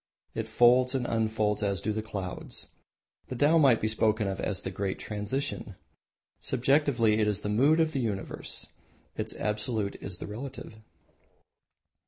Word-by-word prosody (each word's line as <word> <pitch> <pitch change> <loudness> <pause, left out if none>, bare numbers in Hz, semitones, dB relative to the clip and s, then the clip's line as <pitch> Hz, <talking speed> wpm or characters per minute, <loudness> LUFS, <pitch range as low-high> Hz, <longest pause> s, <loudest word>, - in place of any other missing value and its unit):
It 110 -1 -3
folds 125 +3 +4
and 125 -2 0
unfolds 110 -2 0
as 100 -3 0
do 105 +5 -1
the 110 - -2
clouds. 100 -4 -6 0.6
The 130 - -5
Tao 150 +6 +4
might 135 -6 +5
be 110 - 0
spoken 110 -1 +2
of 95 0 -3
as 100 -3 -1
the 95 - -3
Great 95 0 -2
Transition. 105 +6 -3 0.6
Subjectively 125 -4 +2
it 105 - +2
is 105 0 0
the 105 - -2
Mood 140 +10 +4
of 160 -1 +3
the 140 - -2
Universe. 105 -5 -4 0.5
Its - - -3
Absolute 105 -1 -2
is 90 -2 -6
the - - -6
Relative. 115 +1 -7
110 Hz, 155 wpm, -29 LUFS, 105-125 Hz, 0.6 s, might